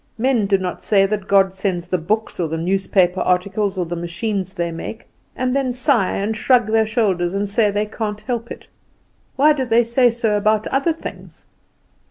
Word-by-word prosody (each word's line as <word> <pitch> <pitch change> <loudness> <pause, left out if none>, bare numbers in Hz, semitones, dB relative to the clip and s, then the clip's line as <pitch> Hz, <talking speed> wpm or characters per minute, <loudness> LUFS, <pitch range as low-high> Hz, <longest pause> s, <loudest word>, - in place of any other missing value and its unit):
Men 235 -3 +1
do 195 -1 +3
not 185 -1 -5
say 195 -2 +3
God 195 -1 +2
sends 190 -3 -3
the 185 0 -1
books, 215 +7 -2
or 170 - 0
the 160 +1 -3
newspaper 185 +1 +1
articles, 190 +2 0
or 180 - -1
the 170 +1 -4
machines 185 +3 -3
they 170 -2 -2
make; 165 +7 -7 0.3
and 255 0 -1
then 270 -2 0
sigh, 250 -5 +1
and 210 +3 -2
shrug 245 +1 +3
their 220 +1 +2
shoulders 195 -5 0
and 205 +1 -1
say 210 +1 +2
they 205 +1 -1
can't 210 -1 -4
help 235 -2 -4
it. - - -9 0.7
Why 300 +3 +5
do 275 -3 -2
they 235 -1 +3
say 240 +2 +3
so 230 -2 0
about 215 +1 +1
other 275 +5 +1
things? 325 - -10
210 Hz, 190 wpm, -20 LUFS, 185-230 Hz, 0.7 s, Why